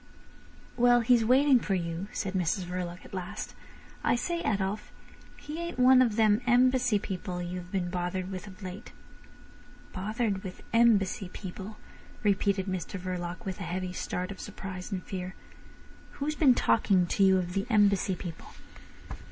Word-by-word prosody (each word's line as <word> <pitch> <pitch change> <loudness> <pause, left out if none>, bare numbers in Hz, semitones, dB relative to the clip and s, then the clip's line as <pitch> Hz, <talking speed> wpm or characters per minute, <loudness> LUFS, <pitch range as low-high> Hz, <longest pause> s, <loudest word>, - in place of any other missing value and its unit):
"Well—he's 240 -1 +5
waiting 260 +3 +5
for 200 -3 -1
you," 170 +1 -3
said 195 -2 -3
Mrs 185 +1 0
Verloc 180 0 -5
at - - -14
last. 180 -2 -5 0.5
"I - - +3
say, 340 +8 -2
Adolf, 200 - -1 0.5
he 300 +2 -7
ain't 340 0 -4
one 255 0 +7
of 235 -4 +2
them 215 0 +4
Embassy 250 -2 +4
people 185 -2 -4
you 175 +1 -4
have 180 0 -11
been 180 -3 -1
bothered 180 +1 -2
with 190 +2 -6
of 195 +1 -12
late?" 185 +5 -8 1.0
"Bothered 210 0 -2
with 185 -1 -8
Embassy 210 -5 +3
people," 195 +3 -8 0.5
repeated 200 -1 +2
Mr 185 0 -4
Verloc, 180 +3 -5
with 190 0 -4
a - - -4
heavy 180 +1 -3
start 180 +1 -3
of 195 - -8
surprise 185 0 -7
and 185 -2 -3
fear. 185 -1 -5 0.8
"Who's 295 +2 -2
been 285 -5 +5
talking 190 -7 +3
to 195 +3 +1
you 190 -1 +6
of 180 -1 -2
the 195 +1 -1
Embassy 200 -4 +3
people?" 165 -1 -8
195 Hz, 155 wpm, -29 LUFS, 185-230 Hz, 1.0 s, one